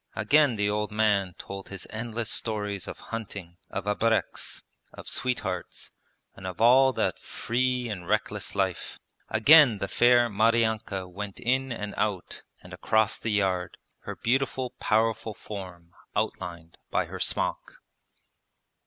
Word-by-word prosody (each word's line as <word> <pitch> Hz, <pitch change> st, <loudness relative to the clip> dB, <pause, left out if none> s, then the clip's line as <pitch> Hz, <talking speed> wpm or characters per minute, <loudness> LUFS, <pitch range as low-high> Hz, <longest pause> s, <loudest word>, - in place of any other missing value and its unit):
Again 145 Hz, -4 st, +4 dB
the 105 Hz, -1 st, 0 dB
old 105 Hz, 0 st, -1 dB
man 105 Hz, -4 st, +1 dB
told 100 Hz, 0 st, -8 dB
his 100 Hz, -2 st, -7 dB
endless 115 Hz, 0 st, -3 dB
stories 105 Hz, -3 st, -1 dB
of -, -, -6 dB, 0.2 s
hunting, 100 Hz, -6 st, -6 dB
of 95 Hz, -, -4 dB
abreks, 110 Hz, +2 st, 0 dB, 0.3 s
of -, -, -11 dB
sweethearts, 110 Hz, -7 st, -2 dB, 0.4 s
and 95 Hz, -, -8 dB
of 90 Hz, -, -6 dB
all 130 Hz, +4 st, +6 dB
that -, -, -1 dB
free 125 Hz, +1 st, -1 dB
and 90 Hz, -6 st, -6 dB
reckless 105 Hz, 0 st, -1 dB
life. 95 Hz, -3 st, -2 dB, 0.3 s
Again 135 Hz, +1 st, +7 dB
the 100 Hz, -, -3 dB
fair 120 Hz, +1 st, +4 dB
Maryanka 110 Hz, -3 st, +1 dB
went 100 Hz, +2 st, -7 dB
in 130 Hz, +2 st, 0 dB
and 105 Hz, -3 st, -4 dB
out 105 Hz, -4 st, -2 dB, 0.2 s
and -, -, -12 dB
across 110 Hz, -1 st, +1 dB
the 115 Hz, -, -3 dB
yard, 95 Hz, -4 st, 0 dB, 0.2 s
her -, -, -7 dB
beautiful 130 Hz, +1 st, 0 dB
powerful 110 Hz, 0 st, +1 dB
form 90 Hz, -5 st, -9 dB, 0.2 s
outlined 85 Hz, -1 st, -4 dB
by -, -, +1 dB
her -, -, -8 dB
smock. -, -, -1 dB
105 Hz, 135 wpm, -27 LUFS, 100-115 Hz, 0.4 s, Again